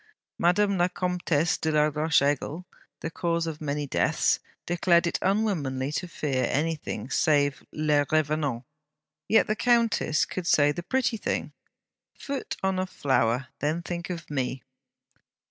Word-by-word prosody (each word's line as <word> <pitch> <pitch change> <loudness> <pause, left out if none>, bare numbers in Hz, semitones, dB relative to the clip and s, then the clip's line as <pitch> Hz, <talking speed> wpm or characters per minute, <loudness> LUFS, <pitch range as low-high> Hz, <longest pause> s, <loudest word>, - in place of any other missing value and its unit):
Madame 195 +2 +3
la 175 - +4
Comtesse 180 -2 0
de 160 - +1
la 150 0 +4
Roche 150 -1 +2
Aigle, 145 +4 -1 0.4
the 160 - -4
cause 170 0 -1
of 160 -2 -5
many 145 -1 -2
deaths, 140 - +1 0.3
declared 175 0 +3
it 170 - -1
unwomanly 165 -10 0
to 180 +4 -3
fear 135 -6 -1
anything 150 -6 -2
save 145 -3 +2
'les 150 -2 +1
revenants.' 150 -5 0 0.6
Yet 220 - +5
the 215 - 0
countess 230 -10 +2
could 180 -2 -5
say 145 -3 +4
the 160 - -4
pretty 250 +3 0
thing: - - -2 0.7
'Foot 275 -1 -5
on 190 -1 +1
a 185 - -1
flower, 130 -5 0
then 155 +4 -1
think 175 +1 -5
of 170 -2 -5
me!' 130 -2 -2
160 Hz, 145 wpm, -27 LUFS, 145-180 Hz, 0.7 s, Yet